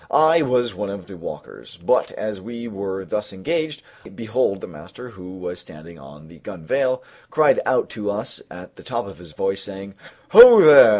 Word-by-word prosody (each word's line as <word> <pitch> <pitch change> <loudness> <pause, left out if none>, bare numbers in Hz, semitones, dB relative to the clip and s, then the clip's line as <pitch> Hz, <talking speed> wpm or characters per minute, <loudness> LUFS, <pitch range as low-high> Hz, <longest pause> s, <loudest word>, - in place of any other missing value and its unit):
I 160 +2 +4
was 125 -4 0
one 105 -1 -5
of 100 -2 -7
the 95 - -12
walkers; 85 - -11
but - - 0
as 105 -3 -6
we 120 +3 -8
were 95 -2 -6
thus 105 +2 -4
engaged, 150 - -4 0.3
behold 110 -3 -1
the - - -8
master, 85 +10 -12
who 95 -3 -12
was 90 -1 -7
standing 80 +1 -14
on 75 +3 -15
the 85 0 -17
gunwale, 130 - -3 0.3
cried - - +3
out - - +1
to 105 -1 -5
us 100 +1 -4
at - - -13
the - - -14
top - - -4
of 100 -3 -12
his 85 -4 -15
voice, 95 +3 -3
saying, 100 0 -9 0.4
"Ho 235 +1 +10
there! 145 -6 +9
100 Hz, 185 wpm, -21 LUFS, 90-125 Hz, 0.4 s, Ho